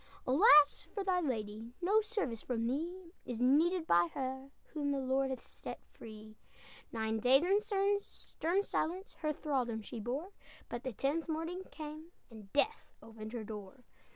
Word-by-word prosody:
"Alas 295 - +6
for 400 - -3
thy 370 -2 +2
lady! 225 -5 -3
No 400 +5 +4
service 415 - -2
from 230 -2 -2
thee 335 +8 -3
Is 240 -2 -5
needed 320 +7 +4
by 175 - +5
her 265 0 -3 0.2
Whom 295 -2 -1
the 280 - +1
Lord 265 +1 +1
hath 260 - -4
set - - -8
free; 215 -1 -11 0.5
Nine 220 -1 -1
days, 260 +6 +5
in 390 +3 +4 0.4
stern 380 -1 -2
silence, 370 +1 -2
Her 305 -1 0
thraldom 255 -7 -1
she 230 - -7
bore, 265 - -3 0.4
But 240 - -4
the 260 - -3
tenth 290 +8 -1
morning 330 +4 -3
came, 310 +1 -8 0.2
And 210 -3 -12
Death 410 +10 0
opened 220 0 -9
her 235 -3 -3
door!" 210 +3 -8
270 Hz, 155 wpm, -34 LUFS, 230-335 Hz, 0.5 s, Alas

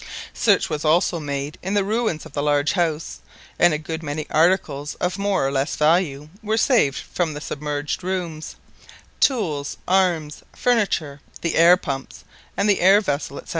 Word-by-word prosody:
Search - - +2
was 150 -1 -4
also 170 +2 +2
made 145 0 -4
in 190 +3 -2
the 200 - +3
ruins 215 -5 -1
of - - -13
the 145 - -2
large 145 0 +2
house, 165 -4 -2 0.4
and 175 - +5
a 155 - 0
good 160 +1 -6
many 150 0 -4
articles 155 -4 +1
of 185 +2 -2
more 200 -7 +1
or - - -2
less 140 +1 -1
value 150 -2 +1
were 215 0 -1
saved 225 - +3
from 165 -4 -3
the - - -5
submerged 145 +2 -4
rooms—tools, 175 - -3
arms, 175 -5 +1
furniture, 195 - 0 0.2
the 170 - -1
air 170 +2 +6
pumps, 135 -7 -6 0.3
and 200 - +1
the 205 - +3
air 195 +3 +6
vessel, 145 -7 -3
&c. - - -16
160 Hz, 165 wpm, -22 LUFS, 145-190 Hz, 0.4 s, air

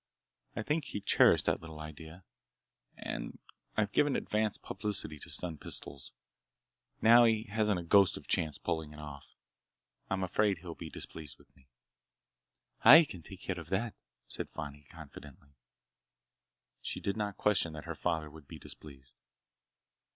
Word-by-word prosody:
I 110 - -2
think 150 +4 0
he - - -4
cherished 100 - +5
that - - +1
little 80 -1 -9
idea,—and 80 +3 -9 0.4
I've 105 -2 +2
given 145 +4 +3
advance 110 0 0
publicity 95 -6 -2
to - - -9
stun 85 -4 -4
pistols. 70 -1 -5 0.9
Now 120 +2 +9
he 110 -1 +3
hasn't 105 -3 +2
a - - -5
ghost 95 +2 +5
of - - -9
a - - -22
chance 80 -2 +1
of - - -28
pulling 80 -2 -2
it 75 - -11
off. 75 -2 -10 0.7
I'm 95 0 0
afraid 100 +2 +2
he'll 85 0 -7
be 80 0 -8
displeased 75 -4 -7
with - - -24
me." 65 - -24 1.2
"I 150 +8 +11
can 90 - -9
take 95 +3 -11
care 95 -2 -3
of 85 -1 -9
that!" 105 +5 0 0.3
said - - -4
Fani 75 -2 -7
confidently. 70 -2 -12 1.3
She - - -3
did 100 - -1
not 105 -2 -2
question 95 -6 +2
that 75 +1 -8
her 85 - -3
father 80 -1 -1
would 75 -2 -13
be - - -9
displeased. 70 -3 -10
85 Hz, 155 wpm, -32 LUFS, 75-105 Hz, 1.3 s, I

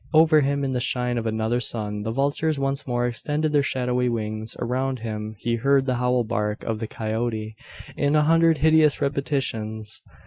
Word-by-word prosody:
Over 155 -1 +6
him, 140 0 0
in 135 - -1
the 125 - 0
shine 125 -1 -1
of 115 - -3
another 110 +2 0
sun 105 -3 -3
the 110 - -3
vultures 140 +4 0
once 135 0 -2
more 120 -1 0
extended 150 +6 -1
their 145 - +4
shadowy 125 -2 0
wings. 110 -1 -4
Around 130 +2 -1
him 110 -1 -5
he 115 +3 -1
heard 135 +3 +3
the 130 -2 0
howl 125 0 +1
bark 105 -2 -2
of 110 -1 -2
the 110 - -4
coyote, 110 0 -3 0.4
in 145 +1 +1
a 150 - +4
hundred 165 +1 +4
hideous 160 -1 +4
repetitions. 115 -7 -2
125 Hz, 180 wpm, -24 LUFS, 110-140 Hz, 0.4 s, Over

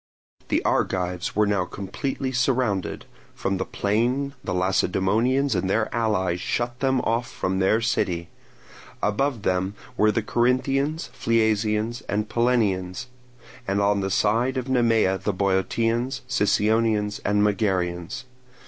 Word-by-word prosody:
The - - 0
Argives 90 -1 0
were 105 +1 +4
now 100 -2 +1
completely 130 +9 -4
surrounded; 125 -6 0 0.3
from 95 - -1
the 95 - -2
plain 125 +7 0
the - - -4
Lacedaemonians 95 +8 +1
and 95 - -1
their 110 +2 0
allies 95 -6 0
shut 120 +1 -2
them 130 -2 +2
off 115 +2 -1
from 95 +1 -2
their 100 +4 +3
city; 85 -7 0 0.8
above 115 +1 0
them 95 +2 0 0.2
were 105 0 +4
the 110 +1 -1
Corinthians, 135 +7 0
Phliasians, 110 0 +1
and 105 +1 0
Pellenians; 105 -6 0 0.6
and 100 +1 +1
on 100 0 +2
the 95 0 -1
side 115 +7 +1
of 130 0 -3
Nemea 115 -7 +2
the 105 - -1
Boeotians, 115 +7 0
Sicyonians, 110 -2 +1
and 105 0 +2
Megarians. 95 +1 -1
105 Hz, 125 wpm, -24 LUFS, 95-120 Hz, 0.8 s, were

